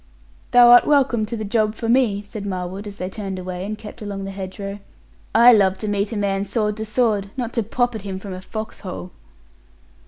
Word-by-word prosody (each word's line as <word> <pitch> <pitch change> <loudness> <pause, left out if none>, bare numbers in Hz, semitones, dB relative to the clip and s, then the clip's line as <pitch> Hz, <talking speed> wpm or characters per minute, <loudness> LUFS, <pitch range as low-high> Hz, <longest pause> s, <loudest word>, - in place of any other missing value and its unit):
'Thou 245 -1 +7
art 245 - +8
welcome 260 -7 +3
to 230 - -4
the 215 - -4
job 215 0 +1
for 225 - -4
me,' 230 -4 +2
said 205 0 -7
Marwood, 190 +1 -4
as 200 -1 -9
they 185 - -3
turned 195 -1 -5
away, 185 0 -5
and 210 +2 -4
kept 215 +2 -11
along 200 -2 -5
the 195 - -5
hedge 190 -1 -7
row; 200 0 -5 0.6
'I 240 +2 +8
love 195 -3 +3
to 215 - -5
meet 205 +1 -1
a 225 - -3
man 195 -1 0
sword 210 +1 -1
to 220 - -4
sword; 215 -3 +1
not 240 -2 -3
to 235 - +1
pop 245 +3 0
at 220 - -5
him 195 -1 -5
from 190 0 -7
a 185 - -7
foxhole.' 190 -3 -7
205 Hz, 220 wpm, -21 LUFS, 195-225 Hz, 0.6 s, art